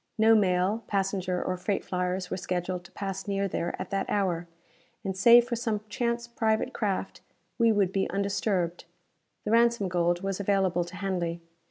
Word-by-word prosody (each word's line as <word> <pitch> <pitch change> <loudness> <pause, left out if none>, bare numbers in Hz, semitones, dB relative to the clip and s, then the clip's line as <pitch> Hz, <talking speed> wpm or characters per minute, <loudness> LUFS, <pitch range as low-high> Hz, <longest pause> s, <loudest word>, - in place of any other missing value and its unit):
No 220 +1 +6
mail, 195 +1 +2
passenger 190 -2 -1
or 185 - -2
freight 195 +2 -2
flyers 180 0 -2
were - - 0
scheduled 180 0 -3
to - - -14
pass 195 0 -5
near 200 0 0
there 175 -2 -3
at - - -6
that 195 0 -1
hour, 180 -4 0 0.6
and, 190 -2 -3
save 235 +5 +7
for 240 - -1
some 225 -3 -1
chance 235 +1 -1
private 220 -2 0
craft, 200 -4 -2 0.4
we 230 -1 +5
would 200 -4 +2
be 195 -1 0
undisturbed. 195 -3 -1 0.6
The 210 - -1
ransom 235 -4 +3
gold 175 0 +1
was 195 0 -2
available 190 -3 +1
to 175 - -10
Hanley. 180 -4 -2
195 Hz, 170 wpm, -28 LUFS, 180-215 Hz, 0.6 s, save